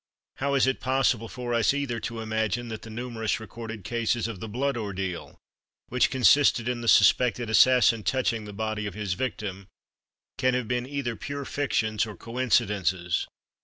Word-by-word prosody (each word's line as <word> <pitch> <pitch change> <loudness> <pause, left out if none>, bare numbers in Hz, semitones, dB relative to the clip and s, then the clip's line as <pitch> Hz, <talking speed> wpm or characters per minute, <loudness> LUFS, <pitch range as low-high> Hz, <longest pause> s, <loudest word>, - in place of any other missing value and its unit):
How 140 +1 0
is 135 - +4
it 130 0 0
possible 130 -3 +1
for 125 -1 -4
us, 115 +3 +3
either, 135 -5 -2
to 115 0 -5
imagine 110 +2 -1
that 110 -1 -6
the 115 - -10
numerous 115 -1 -3
recorded 110 -1 -8
cases 115 +1 -1
of 110 -5 -6
the 110 - -6
Blood 135 +6 -1
Ordeal, 95 -5 -4 0.5
which 125 0 +2
consisted 130 -1 +4
in 125 -1 -2
the 115 - -5
suspected 120 -1 +4
assassin 120 -1 +5
touching 115 -2 0
the 105 - -8
body 110 0 -3
of 100 - -7
his 105 -4 -2
victim, 100 -4 -4 0.7
can 130 0 +2
have 125 -3 -2
been 125 +1 -1
either 140 -5 -3
pure 140 +4 -5
fictions 110 -7 0
or 105 - -8
coincidences? 105 -7 0
115 Hz, 165 wpm, -26 LUFS, 110-125 Hz, 0.7 s, assassin